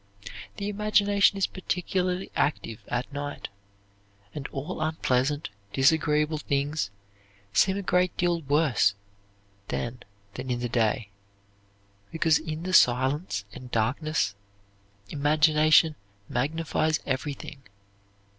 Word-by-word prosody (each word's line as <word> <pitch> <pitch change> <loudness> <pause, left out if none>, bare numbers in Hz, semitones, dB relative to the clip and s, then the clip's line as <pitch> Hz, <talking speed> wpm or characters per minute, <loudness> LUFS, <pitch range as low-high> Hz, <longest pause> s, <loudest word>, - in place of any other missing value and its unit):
The 200 - -3
imagination 205 -1 +3
is 195 - +2
particularly 185 0 -2
active 115 -6 -1
at 125 +3 -3
night, 145 0 -5 0.8
and 145 -3 -5
all 140 +1 -5
unpleasant, 145 -2 0 0.2
disagreeable 150 +2 +2
things 140 -4 -1 0.6
seem 190 - +3
a 200 - -3
great 180 -1 +1
deal 175 -1 +1
worse 140 -8 +2 0.7
then 120 +1 -3 0.3
than 130 +1 -6
in 120 -1 -1
the 120 - -2
day, 115 -1 0 1.0
because 160 -1 +3
in 155 +1 -5
the 185 +1 -3
silence 130 - +3
and 130 -1 -10
darkness 125 +1 0 0.8
imagination 155 +2 +4 0.3
magnifies 155 +3 0
everything. 140 +1 -4
150 Hz, 100 wpm, -27 LUFS, 130-165 Hz, 1.0 s, imagination